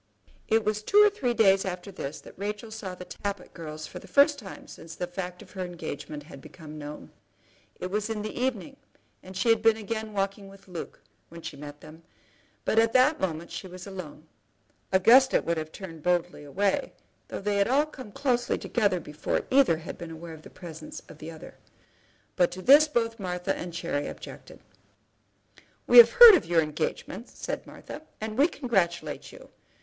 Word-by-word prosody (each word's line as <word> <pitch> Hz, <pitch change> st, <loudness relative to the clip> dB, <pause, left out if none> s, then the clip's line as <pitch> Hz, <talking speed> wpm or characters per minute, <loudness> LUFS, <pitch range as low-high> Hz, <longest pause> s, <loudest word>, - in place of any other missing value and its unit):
It 225 Hz, 0 st, +2 dB
was 215 Hz, 0 st, 0 dB
two 400 Hz, -, +1 dB
or 420 Hz, 0 st, +8 dB
three 250 Hz, -, -1 dB
days 195 Hz, -3 st, +5 dB
after 185 Hz, +1 st, -5 dB
this 145 Hz, -5 st, -6 dB
that -, -, -13 dB
Rachel 210 Hz, +3 st, -5 dB
saw 200 Hz, -4 st, -6 dB
the 180 Hz, -, -9 dB
Tappitt 200 Hz, +2 st, -6 dB
girls 155 Hz, -2 st, -7 dB
for -, -, -9 dB
the -, -, -14 dB
first 285 Hz, +1 st, +4 dB
time 195 Hz, -4 st, -10 dB
since 165 Hz, 0 st, -11 dB
the 180 Hz, -, -3 dB
fact 180 Hz, 0 st, -6 dB
of -, -, -18 dB
her 190 Hz, -2 st, -4 dB
engagement 150 Hz, -4 st, -6 dB
had 140 Hz, -3 st, -12 dB
become 155 Hz, -1 st, -11 dB
known. 150 Hz, 0 st, -9 dB, 0.7 s
It 185 Hz, -, -5 dB
was 210 Hz, +2 st, -1 dB
in 215 Hz, -2 st, -3 dB
the 215 Hz, -, -5 dB
evening, 260 Hz, +1 st, -2 dB, 0.4 s
and 185 Hz, 0 st, -10 dB
she 205 Hz, +4 st, +1 dB
had 225 Hz, -1 st, +4 dB
been 225 Hz, -1 st, +4 dB
again 220 Hz, 0 st, -4 dB
walking 195 Hz, 0 st, -2 dB
with 195 Hz, 0 st, -16 dB
Luke, 180 Hz, -3 st, -8 dB, 0.3 s
when 170 Hz, 0 st, -11 dB
she -, -, -6 dB
met 145 Hz, +1 st, -10 dB
them; 160 Hz, +2 st, -13 dB, 0.6 s
but 220 Hz, -, +3 dB
at 225 Hz, 0 st, +3 dB
that 260 Hz, +5 st, +4 dB
moment 170 Hz, -2 st, -3 dB
she 190 Hz, -, -6 dB
was 185 Hz, 0 st, -10 dB
alone. 185 Hz, -6 st, -9 dB, 0.7 s
Augusta 245 Hz, +8 st, +6 dB
would 170 Hz, 0 st, -1 dB
have 155 Hz, 0 st, -4 dB
turned 165 Hz, -5 st, -9 dB
boldly 175 Hz, -2 st, 0 dB
away, 195 Hz, +8 st, -1 dB, 0.3 s
though -, -, -5 dB
they 205 Hz, +1 st, -1 dB
had 200 Hz, -, +3 dB
all 275 Hz, +5 st, +3 dB
come 260 Hz, -8 st, -11 dB
closely 245 Hz, 0 st, 0 dB
together 205 Hz, -6 st, 0 dB
before 150 Hz, -2 st, -3 dB
either 260 Hz, -11 st, +5 dB
had 160 Hz, -, -8 dB
been 170 Hz, -2 st, -7 dB
aware 165 Hz, +1 st, -9 dB
of 155 Hz, -, -12 dB
the -, -, -13 dB
presence 175 Hz, -, -9 dB
of -, -, -13 dB
the -, -, -7 dB
other. -, -, -11 dB, 0.8 s
But 175 Hz, -2 st, +3 dB
to 185 Hz, -, -8 dB
this 290 Hz, +4 st, +8 dB
both 230 Hz, -5 st, -1 dB
Martha 180 Hz, -2 st, -2 dB
and 175 Hz, -, -6 dB
Cherry 165 Hz, -4 st, -3 dB
objected. -, -, -10 dB, 1.2 s
"We -, -, +9 dB
have 475 Hz, -, +9 dB
heard 480 Hz, -2 st, +11 dB
of 365 Hz, -, +3 dB
your 165 Hz, -1 st, +3 dB
engagement," 155 Hz, +8 st, -4 dB
said -, -, -6 dB
Martha, 295 Hz, -, -9 dB, 0.2 s
"and 215 Hz, 0 st, -4 dB
we 280 Hz, +6 st, +5 dB
congratulate 175 Hz, -, -1 dB
you. -, -, -14 dB
190 Hz, 190 wpm, -27 LUFS, 170-225 Hz, 1.2 s, heard